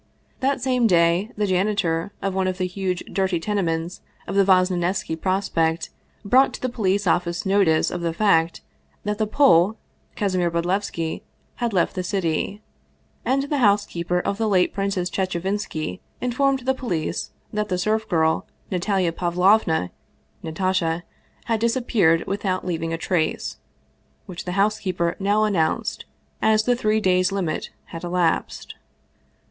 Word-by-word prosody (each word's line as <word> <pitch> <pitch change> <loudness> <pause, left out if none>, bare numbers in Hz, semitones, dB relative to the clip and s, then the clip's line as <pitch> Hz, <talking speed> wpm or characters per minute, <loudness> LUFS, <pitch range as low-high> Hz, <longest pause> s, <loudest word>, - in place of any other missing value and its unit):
That 270 0 0
same 250 -3 +3
day 170 +2 +3
the 210 - +1
janitor 185 -2 0
of 195 -1 -1
one 190 0 0
of 185 0 -2
the 185 - 0
huge, 180 -1 -3
dirty 190 -2 +1
tenements 170 -3 -2 0.3
in - - -4
Vosnesenski 185 -3 +2
Prospekt 165 -3 0 0.3
brought 255 +6 +4
to - - -10
the 255 - +1
police 200 -4 0
office 175 0 0
notice 190 -5 +3
of 175 - -4
the 170 -1 0
fact 165 - +2 0.4
that 210 +1 -2
the 215 - +1
Pole, 210 - +4 0.4
Kasimir 185 -4 +1
Bodlevski, 170 -1 -2 0.4
had 240 -2 -1
left 180 -4 +1
the 185 - -2
city; 190 +2 -2 0.6
and 270 +2 +1
the 285 0 -1
housekeeper 200 -6 +2
of 200 +3 -2
the 225 - +1
late 185 -3 +3
Prin 195 0 -1
cess 180 -2 -1
Chechevinski 185 - -2 0.2
informed 265 +2 +1
the 260 +2 +1
police 185 -12 -3 0.2
that 210 0 -1
the 180 - 0
serf 215 +3 0
girl 160 -2 +1 0.2
Natalia 185 -1 +1
Pavlovna 175 - +2 0.5
(Natasha) 170 0 -1 0.4
had 225 -2 0
disappeared 230 -8 +2
without 195 -2 -2
leav 175 -3 -2
ing 165 0 -2
a 165 - -1
trace, 165 -1 -1 0.7
which 175 -1 -8
the 180 - -3
housekeeper 190 -4 0
now 205 +2 +2
announced, 180 -7 0 0.4
as 215 0 +4
the 245 +2 +2
three 215 -2 +1
days' 185 -2 +2
limit 190 -5 -2 0.2
had 165 - -6
elapsed. 175 -1 -1
185 Hz, 145 wpm, -23 LUFS, 170-210 Hz, 0.7 s, brought